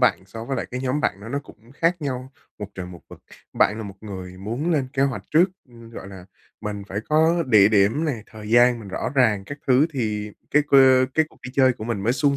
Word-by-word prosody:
bạn - - +2
so 115 +3 -8
với 135 +2 -3
lại - - -3
cái 130 +1 -4
nhóm 130 +3 -1
bạn 100 -9 -1
đó 105 - -9
nó 140 - -2
cũng 120 -3 -15
khác 170 +3 +1
nhau 130 -1 -4 0.3
một 105 - -5
trời 90 -1 -6
một 90 -2 -11
vực. - - -14 0.3
Bạn 105 - +2
là 110 - -5
một 100 -2 -9
người 95 -3 -8
muốn 115 - -3
lên 140 -4 0
kế 135 -2 +1
hoạch 140 -1 -1
trước, 160 +3 +6 0.2
ừm, 115 -1 -14
gọi 95 - -9
là, 95 -2 -11 0.4
mình 105 -2 -5
phải 100 - -3
có 160 +2 +3
địa 105 -4 +6
điểm 110 +9 +3
nè, 125 -9 -2
thời 105 -1 -10
gian 120 +1 +5
mình 105 - -10
rõ 95 - -3
ràng 110 -7 +3
các 145 +8 -8
thứ 135 +4 +4
thì 105 -5 -2 0.2
cái 150 +1 +4
cơ 130 -2 +6
cái 160 - +4
cuộc - - -23
đi 125 - -7
chơi 130 -2 +5
của 110 - -8
mình 110 -4 -3
mới 115 +4 +2
suôn 140 0 +1
120 Hz, 250 wpm, -23 LUFS, 105-135 Hz, 0.4 s, trước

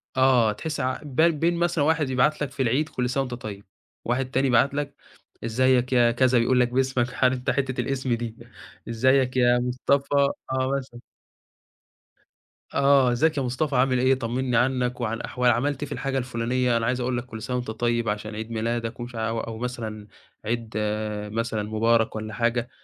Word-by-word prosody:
آه 130 -4 +4
تحس 155 +8 -5
ع 130 -1 -1
بال 155 +4 +3
بين 165 +3 0
مثلًا 170 -3 +1
واحد 155 -2 +1
يبعت 130 +4 +2
لك 145 -3 -2
في 140 0 -4
العيد 135 +6 +1
كل 125 -1 -2
سَنة 135 +2 0
وأنت 125 - -6
طيب، 105 -4 -7 0.4
واحد 130 +2 -1
تاني 135 +1 +2
يبعت 130 +2 +3
لك 145 0 -3 0.5
إزيك 125 +2 +2
يا 120 -1 +5
كذا، 125 +1 +3
يقول 125 +2 +3
لك 125 - +4
باسمك 130 0 0
عارف 130 0 +3
أنت 125 - -3
حتة 130 -1 0
الإسم 130 0 -1
دي 115 -1 -4 0.5
إزيك 130 +2 +2
يا 120 -1 +4
مصطفى 130 +3 0 0.4
آه 130 0 0
مثلًا. 130 -3 -8 1.7
آه. 140 -2 +4
إزيك 155 +6 +1
يا - - +1
مصطفى، 130 +3 -1
عامل 130 0 +3
إيه؟ 130 +1 +4
طمنّي 125 0 -1
عنّك 125 0 0
وعن 115 -1 -2
أحوا 125 0 -1
عملت 130 +4 +1
إيه - - -4
في - - -16
الحاجة 135 -1 -2
الفُلانية؟ 125 0 0
أنا 115 - -1
عايز 125 +2 0
أقول 125 0 -1
لك 120 - -4
كل 115 -3 -9
سَنة 125 - -3
وأنت 125 -3 -4
طيب 120 0 0
عشان 105 +1 -4
عيد 110 +1 -6
ميلادك 115 +1 -2
ومش 120 0 -7
ع 110 0 -1
وأو 115 0 -4
مثلًا 110 -3 -5 0.4
عيد 115 0 -3 0.6
مثلًا 115 -2 -1
مبارك 110 +1 +1
والّا 110 0 -5
حاجة، 120 +1 0
125 Hz, 185 wpm, -25 LUFS, 115-130 Hz, 1.7 s, يا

